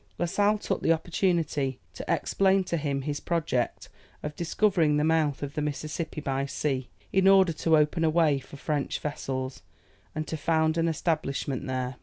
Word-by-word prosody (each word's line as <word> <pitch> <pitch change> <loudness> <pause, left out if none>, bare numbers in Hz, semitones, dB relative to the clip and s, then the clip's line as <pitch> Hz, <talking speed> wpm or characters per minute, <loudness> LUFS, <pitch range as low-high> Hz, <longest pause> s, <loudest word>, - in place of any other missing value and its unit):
La 175 - 0
Sale 205 +4 +2
took - - -2
the - - +3
opportunity 165 -5 0
to - - -7
explain 195 0 +2
to 175 - -2
him 140 -3 -1
his 145 +1 -2
project 160 -8 -1 0.4
of 150 0 -4
discovering 170 -3 +2
the 150 - +2
mouth 155 -3 +1
of 140 -1 -4
the 150 - -2
Mississippi 150 +2 -3
by 135 -2 -1
sea, 135 -3 -2 0.2
in 190 0 +4
order 190 -3 +6
to 160 +1 +3
open 150 +2 +2
a 160 - +4
way 155 -3 +3
for 140 - -12
French 145 0 -2
vessels, 135 -3 -4 0.5
and 155 0 -2
to - - -3
found 160 0 +1
an 165 - +2
establishment 150 -5 -1
there. 130 -1 -3
155 Hz, 175 wpm, -27 LUFS, 140-165 Hz, 0.5 s, order